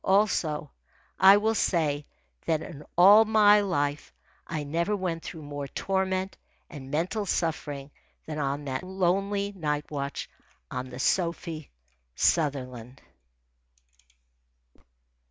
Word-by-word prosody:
Also, 180 -7 +1 0.5
I 195 +1 +8
will 220 +2 +1
say 150 -8 0 0.4
that 160 -1 +1
in 150 -1 -9
all 200 +5 +9
my 210 -1 +5
life 145 -7 -1 0.4
I 155 -3 -3
never 170 +8 -1
went 180 -4 -3
through 160 -1 -8
more 145 -1 -5
torment 190 +2 -1 0.4
and 135 -4 -9
mental 185 +8 -1
suffering 145 -5 -2 0.3
than 155 -1 -5
on 140 0 -2
that 130 -1 -3
lonely 195 +2 0
night 150 -6 -3
watch 140 -2 -4 0.4
on 130 - -4
the 125 - -9
Sophie 165 0 -1 0.5
Sutherland. 130 - 0
165 Hz, 110 wpm, -27 LUFS, 145-190 Hz, 0.5 s, all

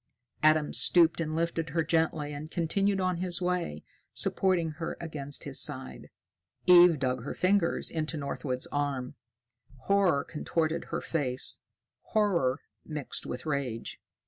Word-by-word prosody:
Adam 155 -1 +3
stooped 170 -1 +4
and 155 -1 -2
lifted 165 -1 -1
her 165 +3 0
gently 160 -2 0
and 150 +2 -7
continued 195 +4 0
on 185 -1 0
his 175 0 -2
way, 180 - -2 0.3
supporting 180 -4 +1
her 160 +2 -5
against 145 -4 -4
his - - +1
side. - - -3 0.6
Eve 175 -2 +8
dug 130 -3 -1
her 140 - -5
fingers 185 -1 +2
into 160 0 -2
Northwood's 140 -2 -3
arm. 140 -3 -2 0.7
Horror 190 -5 +2
contorted 160 +1 -2
her - - -4
face, 130 -6 0 0.5
horror 170 -11 +2 0.2
mixed 150 -3 -4
with 125 - -6
rage. 140 -7 -3
160 Hz, 130 wpm, -29 LUFS, 145-175 Hz, 0.7 s, Eve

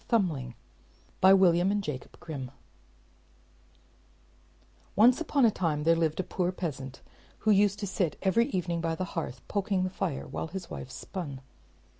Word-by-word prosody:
THUMBLING 155 - 0 0.6
By 190 - +7
William 180 0 +4
and 205 0 0
Jacob 140 -7 -6
Grimm 140 -6 -6 2.5
Once 245 +8 +6
upon 285 -5 +3
a 225 - +5
time 160 -6 -1
there 165 +1 +5
lived 160 -1 0
a - - +1
poor 180 0 -1
peasant, 135 -7 -5 0.4
who 215 - +3
used 200 0 +4
to - - -1
sit 185 -4 -1
every 230 +5 +3
evening 175 -6 -1
by 165 0 -1
the 185 - -2
hearth, 135 -7 -5
poking 195 -2 0
the 185 - -2
fire, 175 -7 -3
while - - -4
his 190 +2 -7
wife 70 -2 -6
spun. 145 -8 -6
180 Hz, 155 wpm, -29 LUFS, 155-195 Hz, 2.5 s, By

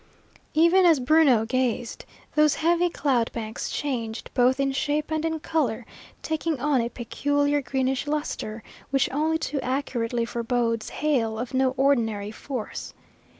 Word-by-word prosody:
Even 340 +4 +5
as 330 -5 +5
Bruno 260 -4 +4
gazed, 245 -1 -1 0.3
those 305 -1 +4
heavy 345 +2 +2
cloud 255 -8 0
banks 220 -1 -4
changed, 235 -6 -3
both 255 +1 +3
in 275 0 +1
shape 295 +3 -1
and 315 0 0
in 320 -1 -1
colour, 255 -8 -1 0.4
taking 315 -2 -1
on 275 -1 +2
a 235 - -2
peculiar 285 +4 0
greenish 265 +1 -1
lustre 265 -7 -3 0.3
which 275 -1 +1
only 310 +4 +1
too 295 -3 -3
accurately 245 -3 -1
forebodes 230 -1 -1
hail 240 -8 0
of 240 +3 -5
no 260 0 +2
ordinary 225 -7 +1
force. 245 0 -6
265 Hz, 140 wpm, -25 LUFS, 235-300 Hz, 0.4 s, Even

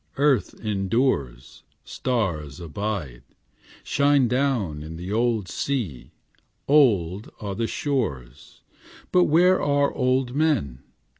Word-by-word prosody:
Earth 140 -5 +2
endures; 95 - -1 0.2
Stars 85 - -2
abide 85 - -4 0.6
Shine 140 -2 +3
down 120 - 0
in 80 +2 -8
the 90 +4 -6
old 115 -3 0
sea; 105 - -3 0.6
Old 105 - +3
are 100 -2 -4
the 115 +3 -2
shores; 75 - -4 0.5
But 180 -1 +5
where 180 +4 +4
are 145 -1 +1
old 130 -1 0
men? 140 - 0
110 Hz, 100 wpm, -24 LUFS, 85-140 Hz, 0.6 s, But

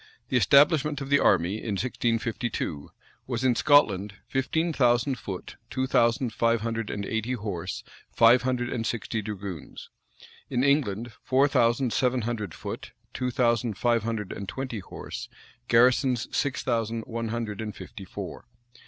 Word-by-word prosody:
[] - - -38
The 125 - +3
establishment 145 - +4
of 135 -1 -6
the 145 - +6
army, 90 +4 +3
in 110 -1 -4
1652, 115 - -2 0.4
was, 125 -1 -2
in 130 -1 +4
Scotland, 105 -9 +3
fifteen 160 +5 0
thousand 125 0 +2
foot, 95 -3 -7
two 130 - -1
thousand 120 -1 +2
five 115 -1 +2
hundred 115 -1 -2
and 100 -1 -3
eighty 110 +4 -2
horse, 100 -8 -4 0.3
five 120 +2 +6
hundred 125 -1 -1
and 115 - -2
sixty 115 -1 -2
dragoons; 100 -6 -7 0.6
in 125 0 +1
England, 120 -6 +1
four 135 +2 +3
thousand 120 -2 +2
seven 125 -1 +1
hundred 110 -6 -3
foot, - - -7 0.2
two 125 -1 -1
thousand 120 -3 +1
five 120 -1 +2
hundred 110 -3 -3
and 100 -2 -6
twenty 130 -4 -4
horse, 95 - -8 0.4
garrisons 125 +1 +4
six 140 -1 0
thousand 115 -2 -1
one 115 0 -4
hundred 110 -2 -3
and 105 -1 -5
fifty 100 - -9
four. 95 - -8
115 Hz, 155 wpm, -27 LUFS, 110-130 Hz, 0.6 s, the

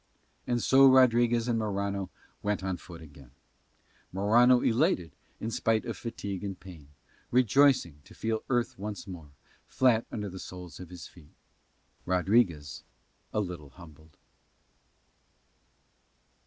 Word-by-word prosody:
And 120 -2 0
so 135 +1 +6
Rodriguez 120 -2 +4
and 115 -2 +1
Morano 100 -2 -2 0.3
went 105 -2 -2
on 95 -2 -2
foot 85 -1 -12
again, 70 -4 -15 0.8
Morano 120 +6 +4
elated 115 - +1 0.3
in 115 - -4
spite 110 0 0
of 115 -3 -4
fatigue 100 -3 -6
and 95 -2 -5
pain, 85 -7 -13 0.4
rejoicing 125 - +3
to - - -16
feel 110 0 -2
the - - -30
earth 120 -5 -2
once 105 0 -6
more, 85 -6 -10 0.4
flat 120 -3 +2
under 105 -1 -4
the 95 -1 -8
soles 90 -3 -9
of 90 -2 -9
his 90 -1 -10
feet; 75 -4 -17 0.7
Rodriguez 90 - +1 0.5
a 105 - 0
little 90 -7 -6
humbled. 80 -1 -16
100 Hz, 130 wpm, -29 LUFS, 90-115 Hz, 0.8 s, so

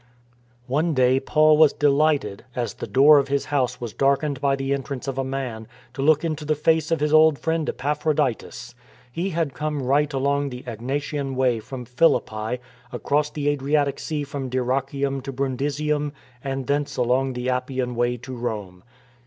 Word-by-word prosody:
One 150 +5 0
day 130 0 +4
Paul 155 +2 +4
was 155 -2 +6
delighted, 145 -7 +1
as 120 -5 -2
the - - -7
door 145 +3 +6
of 140 - -1
his 140 0 0
house 130 -4 -1
was 120 -3 -6
darkened 140 0 +1
by 140 -1 +2
the 135 0 -1
entrance 140 -1 -4
of 135 -1 -3
a - - +1
man, 130 -5 -4 0.3
to 135 - -5
look 155 +2 +3
into 155 -2 -3
the 155 +1 0
face 160 +2 +2
of 165 - +1
his 150 +1 0
old 155 -1 +6
friend 160 0 -1
Epaphroditus. 145 -4 -2 0.4
He 170 +9 -2
had 165 -5 -1
come 150 0 -3
right 145 +3 +2
along 140 +1 0
the 125 -1 -8
Egnatian 135 +4 -3
Way 130 -3 +2
from 125 +3 -8
Philippi, 120 -4 +1 0.3
across 145 +4 0
the 150 -1 -3
Adriatic 145 0 0
Sea 150 -2 -3
from 140 -2 -5
Dyrrachium 135 +2 -1
to 135 +1 -6
Brun 135 0 -2
disium, 145 +2 -1 0.3
and 135 -1 -3
thence 145 +1 -1
along 130 +2 +1
the 125 +1 -2
Appian 125 0 -2
Way 120 +1 0
to 125 +2 -9
Rome. 105 -7 -5
135 Hz, 175 wpm, -23 LUFS, 125-150 Hz, 0.4 s, was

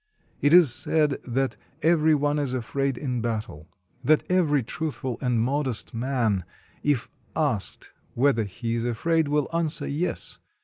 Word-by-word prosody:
It 145 - +3
is 170 -7 +7
said 150 +2 +2
that 130 +2 -1 0.3
every 160 -1 +4
one 145 +1 +1
is 135 -3 -1
afraid 135 +2 -1
in 125 -4 -2
battle; 110 -9 -4 0.3
that 155 +4 +4
every 150 -7 +3
truthful 135 -1 -4
and 125 -3 +1
modest 130 0 -1
man, 115 -5 0 0.4
if 145 -5 +1 0.3
asked 140 -10 -2 0.2
whether 125 -2 +3
he 115 +4 -4
is 115 0 -1
afraid, 155 +7 +1
will 145 0 +1
answer 165 -2 0
"Yes." 165 +5 -3
135 Hz, 140 wpm, -25 LUFS, 120-150 Hz, 0.4 s, is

